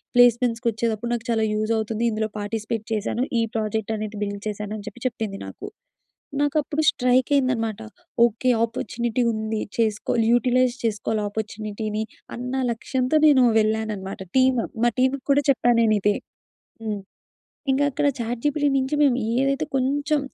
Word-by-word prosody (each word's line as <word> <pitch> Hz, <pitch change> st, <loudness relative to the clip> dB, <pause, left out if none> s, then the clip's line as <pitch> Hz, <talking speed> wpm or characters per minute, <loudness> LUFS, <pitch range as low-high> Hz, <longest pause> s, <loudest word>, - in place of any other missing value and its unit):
ప్లేస్మెంట్స్‌కొచ్చేటప్పుడు 235 Hz, -1 st, +2 dB
నాకు 230 Hz, -, -6 dB
చాలా 220 Hz, -1 st, +2 dB
యూజ్ 215 Hz, +1 st, -1 dB
అవుతుంది. 220 Hz, +1 st, -2 dB
ఇందులో 215 Hz, 0 st, -1 dB
పార్టిసిపేట్ 215 Hz, +1 st, -3 dB
చేశాను. 220 Hz, +3 st, -1 dB, 0.2 s
ఈ -, -, +2 dB
ప్రాజెక్ట్ 220 Hz, 0 st, -1 dB
అనేది 215 Hz, 0 st, -5 dB
బిల్డ్ 200 Hz, 0 st, -4 dB
చేశాను," 210 Hz, 0 st, -5 dB
అని 205 Hz, -, -9 dB
చెప్పి 240 Hz, -, -17 dB
చెప్పింది 220 Hz, -4 st, -4 dB
నాకు. -, -, -9 dB, 0.8 s
నాకు 290 Hz, +1 st, 0 dB
అప్పుడు 310 Hz, +1 st, -1 dB
స్ట్రైకైందనమాట. 250 Hz, -3 st, +1 dB, 0.5 s
ఓకే, 240 Hz, +3 st, -2 dB, 0.2 s
ఆపర్చునిటీ 235 Hz, +1 st, -2 dB
ఉంది. 220 Hz, 0 st, -2 dB, 0.2 s
చేసుకోవాలి 225 Hz, +1 st, +1 dB
యుటిలైజ్ 250 Hz, 0 st, +3 dB
చేసుకోవాలి 215 Hz, 0 st, -1 dB
ఆపర్చునిటీని. 215 Hz, 0 st, -4 dB, 0.3 s
అన్న 250 Hz, +2 st, -4 dB, 0.2 s
లక్ష్యంతో 255 Hz, +4 st, -1 dB
నేను 265 Hz, -4 st, +6 dB, 0.2 s
వెళ్ళానన్నమాట. 215 Hz, -3 st, -2 dB, 0.2 s
టీమ్ 255 Hz, -2 st, +4 dB, 0.2 s
మా 240 Hz, -, +4 dB
టీమ్‌కి 260 Hz, +1 st, +1 dB
కూడా 285 Hz, +1 st, +3 dB
చెప్పాను 240 Hz, -3 st, +3 dB
నేను 215 Hz, -1 st, +3 dB
ఇదే. 205 Hz, 0 st, +3 dB, 0.7 s
హ్మ్. 210 Hz, -2 st, -2 dB, 0.7 s
ఇంకా 275 Hz, +2 st, +3 dB
అక్కడ 290 Hz, +2 st, 0 dB
చాట్‌జీపీటీ‌ 270 Hz, +6 st, 0 dB
నుంచి 265 Hz, +2 st, -1 dB
మేము 270 Hz, -4 st, +4 dB, 0.2 s
ఏదైతే 275 Hz, +3 st, +1 dB
కొంచెం 285 Hz, +3 st, +1 dB
230 Hz, 135 wpm, -24 LUFS, 215-255 Hz, 0.8 s, నేను